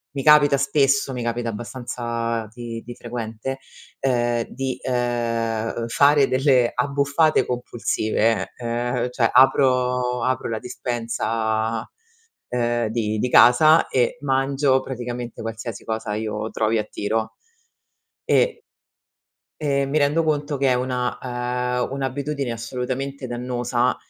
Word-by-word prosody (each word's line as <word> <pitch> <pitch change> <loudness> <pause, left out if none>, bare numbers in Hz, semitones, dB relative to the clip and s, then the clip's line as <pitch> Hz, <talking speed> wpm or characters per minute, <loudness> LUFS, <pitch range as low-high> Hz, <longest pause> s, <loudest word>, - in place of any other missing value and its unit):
mi 135 - -2
capita 150 -1 +6
spesso 135 -1 +2
mi 125 -2 -4
capita 120 0 -2
abbastanza 115 0 -4
di 115 -1 -6
di 120 0 -8
frequente, 120 +2 -5 0.4
ehm, 120 -3 +1
di, 130 -1 -4
ehm, 115 -2 -1
fare 140 +2 +4
delle 130 -2 +3
abbuffate 140 +4 +2
compulsive, 115 -3 -1
ehm, 120 +1 -2
cioè 120 -2 +1
apro 125 -1 +3
apro 130 -1 0
la 110 -1 -2
dispensa, 115 -2 -2 0.6
ehm, 120 -1 0
di 110 -1 -1
di 125 - 0
casa 155 +8 +6
e 125 -2 +1
mangio 135 0 +2
praticamente 120 -2 -6
qualsiasi 115 +1 -6
cosa 110 -1 -3
io 110 0 -3
trovi 110 +1 +1
a 105 - 0
tiro. 110 +1 -3 0.9
E 465 -2 +1 0.9
e 140 -2 0
mi 140 +3 -1
rendo 150 +3 +2
conto 150 -2 -1
che 135 0 +2
è - - +4
una, 125 0 -2
ehm, 125 0 -2
un'abitudine 140 0 -3
assolutamente 130 +3 -4
dannosa 125 0 -1
125 Hz, 115 wpm, -22 LUFS, 115-135 Hz, 0.9 s, capita